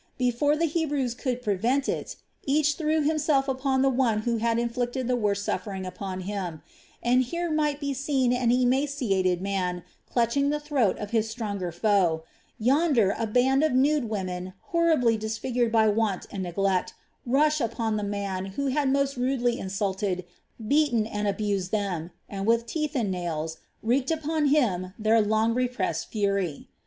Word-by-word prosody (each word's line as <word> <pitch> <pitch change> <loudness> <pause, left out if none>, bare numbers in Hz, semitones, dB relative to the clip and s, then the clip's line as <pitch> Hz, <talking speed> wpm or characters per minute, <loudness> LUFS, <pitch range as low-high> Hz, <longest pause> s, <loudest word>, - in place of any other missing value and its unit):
Before 255 +4 +2
the 335 - +2
Hebrews 290 -6 -1
could 250 -1 -3
prevent 240 +7 +1
it, - - -3 0.3
each 300 +2 +3
threw 310 0 0
himself 295 -2 +2
upon 265 0 +1
the 270 - +4
one 240 -5 +1
who 235 +1 0
had 230 +1 +1
inflicted 245 +1 -1
the 250 - +2
worst 205 -3 0
suffering 195 -3 -3
upon 185 0 -5
him; 185 -5 -4 0.4
and 250 +2 +4
here 340 +7 -2
might 300 -2 +1
be 285 -1 -2
seen 265 -2 +1
an 245 -1 +1
emaciated 245 - +1
man 180 -3 -2 0.3
clutching 245 +4 +2
the 295 +1 0
throat 285 -9 +1
of 205 -1 -6
his 225 -1 +1
stronger 205 -6 -3
foe, 175 -3 +2 0.3
yonder 250 - +3
a 225 - -2
band 255 +5 +3
of 310 -4 +2
nude 270 -1 +2
women 185 -3 -4 0.2
horribly 315 -10 +3
disfigured 225 +2 -1
by 220 -1 +4
want 210 -2 0
and 195 - -4
neglect, 185 +1 0 0.3
rush 300 +4 +2
upon 225 -1 -1
the 210 - -2
man 200 -2 -3
who 280 -1 0
had 280 0 +1
most 275 0 +1
rudely 245 -1 0
insulted, 190 -1 -2 0.4
beaten, 280 -5 +3
and 210 -1 -2
abused 200 -2 -1
them, 185 -6 -2 0.2
and 195 0 -4
with 230 0 +3
teeth 305 +4 -3
and 225 -7 0
nails 165 -3 -3 0.3
wreak 255 +4 +1
upon 315 -1 0
him 195 -11 +1
their 220 +1 +3
long 220 +2 +2
repressed 245 -9 -1
fury. 200 -7 -1
235 Hz, 160 wpm, -26 LUFS, 200-275 Hz, 0.4 s, the